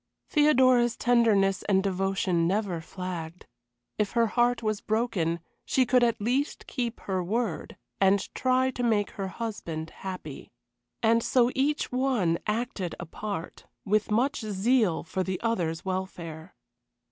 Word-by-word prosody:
Theodora's 255 -5 +4
tenderness 215 -5 +3
and 190 -1 +3
devotion 190 -3 +1
never 190 -3 -1
flagged. 175 -1 -6 0.5
If 210 -2 0
her 235 -1 +4
heart 240 -1 +2
was 215 -1 -1
broken 210 -7 0 0.2
she 260 - +2
could 250 0 +4
at 235 -1 +2
least 255 +7 -1
keep 240 -3 -3
her 190 -2 -2
word, 215 0 -2 0.2
and 195 0 +2
try 255 0 +2
to 250 - -5
make 215 -4 +1
her 195 -1 -4
husband 175 -7 -5
happy. 180 -7 -7 0.5
And 230 +1 +4
so 245 -1 +3
each 290 +3 0
one 250 -10 +1
acted 210 -5 -2
a 175 - -5
part, 200 0 -6 0.2
with 210 +1 +1
much 255 +7 +1
zeal 215 -2 +1
for 185 +3 -3
the 185 -1 -2
other's 175 -8 -1
welfare. 180 -3 -5
210 Hz, 135 wpm, -27 LUFS, 185-240 Hz, 0.5 s, Theodora's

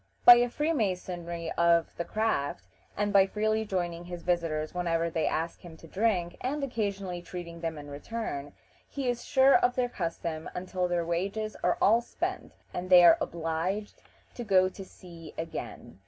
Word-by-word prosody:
By 240 0 +11
the 245 0 +2
freemasonry 180 - -2
of 170 -1 +2
the 170 - -3
craft, 145 - -1 0.3
and 205 0 0
by 195 -1 +6
freely 215 +2 0
joining 175 -3 -3
his 175 -1 -7
visitors 165 -3 -1
whenever 170 -2 0
they 160 -1 0
ask 165 +2 -2
him 165 -2 -12
to 165 - -14
drink, 185 -2 0
and 280 +3 -2
occasionally 200 -8 -3
treating 170 -1 -8
them 165 -2 -3
in 145 0 -9
return, 145 -1 -5 0.4
he 275 -2 -4
is 240 -1 -1
sure 265 +1 +5
of 245 0 +3
their 250 -1 0
custom 165 -4 -4
until 180 0 -2
their 175 -1 -1
wages 195 +6 -2
are 180 - +2
all 225 +3 +5
spent - - -4 0.2
and 180 +1 -4
they 180 -1 +8
are - - +7
obliged 170 +5 -3 0.3
to 240 - -6
go 185 -3 +4
to 195 - -9
sea 170 -4 -13
again. 160 - -7
180 Hz, 170 wpm, -29 LUFS, 170-215 Hz, 0.4 s, By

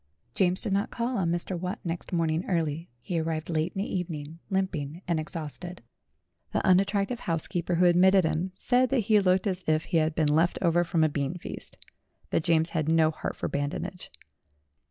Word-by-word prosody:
James 180 +3 +3
did 195 - -1
not 200 +1 +1
call 240 +2 -2
on 185 -6 +1
Mr. 175 +2 -1
Watt 180 +5 -3
next 170 -2 -4
morning 165 -1 +1
early; 165 -2 -1
he 170 +3 -1
arrived 160 0 -2
late 160 +2 0
in 195 - -1
the - - -4
evening, 165 -3 -4
limping 180 -4 -2
and 170 -2 +1
exhausted. 165 +1 -6 0.7
The - - 0
unattractive 200 +5 +2
housekeeper 170 +1 -2
who 180 +2 +4
admitted 185 +2 +5
him 165 +4 -1
said 250 +4 +2
that 270 -3 +2
he 215 +1 +3
looked 185 0 +2
like 200 - +2
as 180 0 -6
if 155 0 +2
he 170 - 0
had 155 0 +1
been 150 -2 +2
left 165 +3 +2
over 175 -1 +3
from 165 -1 +1
a - - +5
beanfeast. 150 +3 -4 0.6
But 165 - +1
James 165 0 +2
had 160 -2 -1
no 160 -1 +4
heart 155 - -5
for - - -3
badinage. 145 +6 -4
170 Hz, 190 wpm, -28 LUFS, 160-185 Hz, 0.7 s, admitted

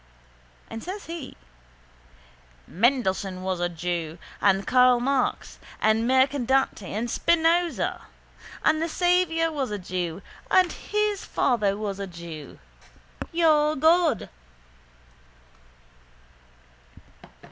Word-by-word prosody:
And 225 - -8
says 390 +3 -6
he: 330 -4 -8 1.3
—Mendelssohn 195 -4 0
was 185 -1 -2
a 175 0 0
jew 170 -1 -4 0.2
and 195 -1 +3
Karl 250 -1 +5
Marx 265 +1 -1 0.2
and 220 +2 +2
Mercadante 265 -2 +2
and 225 +4 -2
Spinoza. 335 +5 +1 0.6
And 310 0 +3
the 330 - -1
Saviour 350 -2 +1
was 280 -4 -2
a 210 - -3
jew 180 -1 -4 0.3
and 370 -1 +4
his 420 -1 -2
father 210 -6 0
was 205 -2 -4
a 200 - -4
jew. 170 -4 -10 0.7
Your 310 -3 +3
God. 320 -2 +3
255 Hz, 95 wpm, -25 LUFS, 195-325 Hz, 1.3 s, Karl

